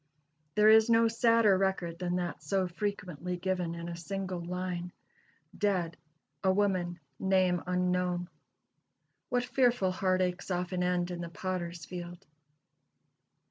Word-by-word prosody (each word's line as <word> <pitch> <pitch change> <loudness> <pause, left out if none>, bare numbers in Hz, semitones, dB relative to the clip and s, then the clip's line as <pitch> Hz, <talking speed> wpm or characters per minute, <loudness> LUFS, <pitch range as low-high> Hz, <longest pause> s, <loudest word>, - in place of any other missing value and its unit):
There 210 0 +5
is 220 +1 +7
no 230 0 +5
sadder 230 -2 +4
record 185 -3 -1
than 180 -1 -1
that 175 -4 -3
so 185 +5 0
frequently 180 -2 -4
given 180 -2 -1
in 170 0 -6
a 170 - -4
single 185 0 -4
line: 180 0 -4 0.6
"Dead 185 -5 0 0.5
a 190 - +4
woman, 185 -3 0 0.2
name 185 -2 +2
unknown." 180 -1 0 1.0
What 245 0 +1
fearful 245 -8 +2
heart 185 0 +1
aches 180 +1 -2
often 180 0 -1
end 180 0 0
in 175 -1 -4
the 170 - -5
Potter's 175 -2 -4
field! 175 +1 -8
180 Hz, 130 wpm, -31 LUFS, 175-195 Hz, 1.0 s, is